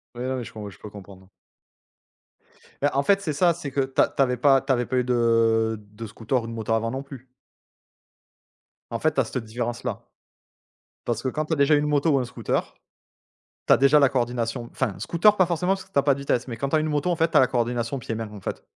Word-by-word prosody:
Oui, 120 - -5
non, 130 0 -2
mais 125 - -4 0.2
mais 100 - -7
je - - -16
peux 105 - -9
comprendre. 95 -2 -13 1.5
Bah, 145 - +2
en 140 +1 +1
fait, 200 +3 +3
c'est 155 -5 -2
ça, 170 +4 +3
c'est 150 -5 -7
que 140 - 0
tu 135 0 -4
as - - +4
tu 140 - -2
avais 125 -2 +2
pas 135 +1 +4
tu 135 0 -2
avais 120 -2 +1
pas 130 - -2
eu 125 - +2
de 115 -2 +2
de 110 +1 -8
scooter 115 +4 -2
ou - - -7
de 115 - -6
moto 115 0 -4
avant, 115 +1 0
non 135 +1 -4
plus? 135 -2 -12 1.6
En - - -3
fait, - - +1
tu - - -1
as - - -2
cette 125 - -4
différence 120 +1 -4
là. - - -4 1.0
Parce - - -2
que 130 - -1
quand 155 +4 -2
tu 160 - -4
as - - +2
déjà 140 +2 +4
eu - - +3
une 150 - -1
moto 150 +2 +2
ou 140 - +3
un 125 - -1
scooter. 120 - -3 0.9
Tu - - +6
as - - +8
déjà 140 +2 +5
la 140 - +5
coordination, 120 -2 -2
enfin 115 -8 -2
scooter 170 - +3
pas 185 -3 +4
forcément 180 +2 0
parce 190 -1 -9
que 190 - -28
tu - - -30
as 140 - +5
pas 140 -1 +3
de 140 - -9
vitesses, 135 -2 -1
mais 115 - -5
quand 140 +1 -3
tu - - -2
as 155 - +4
une 155 - -1
moto, 150 +3 0
en - - +2
fait, 165 0 +2
tu - - 0
as - - +8
la 130 - +5
coordination 120 +1 -2
pieds 115 - -11
et - - -2
mains, 115 -1 -4
en 105 - -10
fait. - - -6
130 Hz, 270 wpm, -24 LUFS, 115-145 Hz, 1.6 s, as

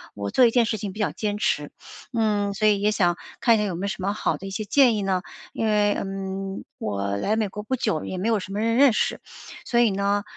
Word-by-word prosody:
我 100 -1 -4
做 255 - +4
一 - - +3
件 240 -1 +3
事 220 - -1
情 205 -1 -5
比 210 - -11
较 210 - +1
坚 210 -1 -3
持。 150 -8 -1 0.4
嗯， 210 -4 +1
所 215 +2 +2
以 205 -1 +3
也 210 - +3
想 175 -5 +1 0.2
看 235 - +5
一 215 - +1
下 - - +1
有 185 - -3
没 180 - -5
有 - - -1
什 190 - -5
么 195 - 0
好 215 - -1
的 195 - -8
一 - - -5
些 210 +2 -4
建 245 0 +4
议 205 - -2
呢？ 190 -1 0 0.3
因 225 - -1
为， 205 -1 +3
嗯， 195 0 -4 0.2
我 100 -1 -2
来 210 - 0
美 220 -1 0
国 205 +2 -7
不 220 +5 -2
久， 215 -10 -1
也 185 - -5
没 190 - -2
有 225 -2 +2
什 195 0 -8
么 205 - -2
人 230 +1 +1
认 275 +1 +6
识， - - -1 0.4
所 235 - +1
以 235 -3 +4
呢， 200 +1 0
205 Hz, 290 characters per minute, -24 LUFS, 195-220 Hz, 0.4 s, 认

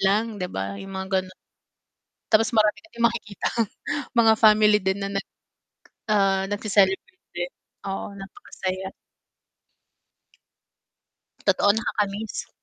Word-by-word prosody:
lang 210 +1 +1
di 180 - -2
ba 100 +1 -4
yung 195 - -9
mga 190 0 -4
ganun. 185 0 -13 1.0
Tapos 225 +1 +5
marami 215 -1 +4
ka - - -17
ding 235 0 -2
makikitang 230 0 -1 0.5
mga 225 -1 +6
family 215 -1 +6
din 190 +1 0
na 195 - -3
nag 195 - -2 0.8
ah, 195 -2 +3
nagce-celebrate 205 - +1
din, 175 0 -2 0.4
oo, 195 +1 -4
napakasaya. 190 -1 -6 2.5
Totoo 205 - +4
nakakamiss. 210 -1 -2
200 Hz, 110 wpm, -24 LUFS, 190-215 Hz, 2.5 s, mga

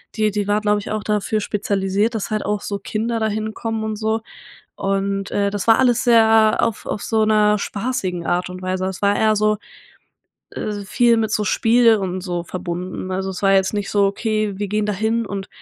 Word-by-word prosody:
die 215 -1 +2
die 205 -1 -2
war, 205 +1 +1
glaube 210 0 +2
ich, 205 - -7
auch 215 -1 -2
dafür 210 0 0
spezialisiert, 200 +1 0
dass 210 - -3
halt 215 - -1
auch 210 0 -1
so 200 - -3
Kinder 225 +3 -2
dahin 220 0 -2
kommen 225 -1 -3
und 220 0 -2
so 220 +1 -1 0.5
und, 195 0 -2
äh, 200 0 +1
das 205 0 -4
war 225 - +6
alles 245 -2 +3
sehr 225 -2 +5
auf 230 -2 -1
auf 205 - -3
so 220 -1 +1
'ner 210 -1 +3
spaßigen 200 -7 -3
Art 180 +1 0
und 180 0 -8
Weise. 185 0 -2
Es 190 - -6
war 200 0 +3
eher 215 0 +3
so, 215 0 +2 0.9
äh, 210 -1 -4
viel 235 +3 +3
mit 220 -1 0
so 210 - +1
Spiel 230 +2 +4
und 185 -2 -3
so 175 -2 -3
verbunden. 180 +1 -5
Also, 190 +1 -2
es 185 - -7
war 195 0 +4
jetzt 190 +2 +2
nicht 205 -1 -2
so: 200 -1 +3
„Okay, 215 0 -1
wir 205 - -2
gehen 210 +1 0
dahin 220 +3 0
und 195 -1 -5
210 Hz, 210 wpm, -20 LUFS, 195-220 Hz, 0.9 s, war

